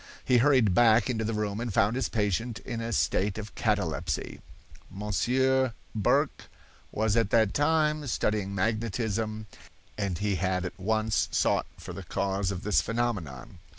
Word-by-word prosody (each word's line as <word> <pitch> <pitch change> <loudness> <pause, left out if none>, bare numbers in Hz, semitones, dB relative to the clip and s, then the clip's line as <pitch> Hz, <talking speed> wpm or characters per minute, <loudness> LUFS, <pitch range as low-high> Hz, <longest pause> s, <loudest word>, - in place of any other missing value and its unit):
He 125 -2 +4
hurried 125 -7 +4
back 115 +4 +4
into 110 -2 -2
the 110 0 -2
room 105 -1 -2
and 120 -1 -3
found 105 +2 +2
his 130 - -1
patient 110 +2 -1
in 115 +1 -5
a 115 +1 -3
state 100 -2 +1
of 110 0 -7
catalepsy. 90 - -2 0.5
Monsieur 130 +6 +1 0.2
Burq 105 - +1 0.4
was 110 -1 0
at 115 -3 +2
that 110 -3 +3
time 150 0 +1
studying 105 -4 -1
magnetism, 110 +1 -1 0.5
and 100 -4 -1
he 100 +1 0
at 95 -1 -2
once 110 +2 +1
sought - - +1
for - - -9
the - - -7
cause 95 0 -1
of 95 -2 -4
this 105 - +3
phenomenon. 95 - -3
110 Hz, 150 wpm, -28 LUFS, 100-115 Hz, 0.5 s, He